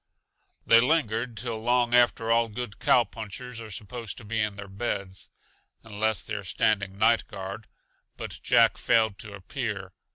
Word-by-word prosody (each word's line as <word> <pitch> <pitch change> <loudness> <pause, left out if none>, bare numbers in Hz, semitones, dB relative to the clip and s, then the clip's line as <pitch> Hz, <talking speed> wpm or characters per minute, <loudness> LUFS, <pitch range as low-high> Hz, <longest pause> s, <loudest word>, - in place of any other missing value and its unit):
They 115 - +7
lingered 115 -4 +1
till 115 0 -3
long 120 +1 +2
after 120 -2 +4
all 115 0 +3
good 110 -1 -6
cowpunchers 115 +1 0
are 110 - -8
supposed 110 +2 -6
to 115 - -10
be 110 +1 -2
in 105 -1 -1
their 100 0 -8
beds 100 -2 -4 0.5
unless 110 -2 -1
they - - -6
are - - -3
standing 100 -3 0
night 115 +2 +3
guard 100 +1 -7 0.5
but - - -7
Jack - - +4
failed 110 -3 +2
to 105 -2 -8
appear. 100 -2 -5
110 Hz, 155 wpm, -27 LUFS, 100-120 Hz, 0.5 s, They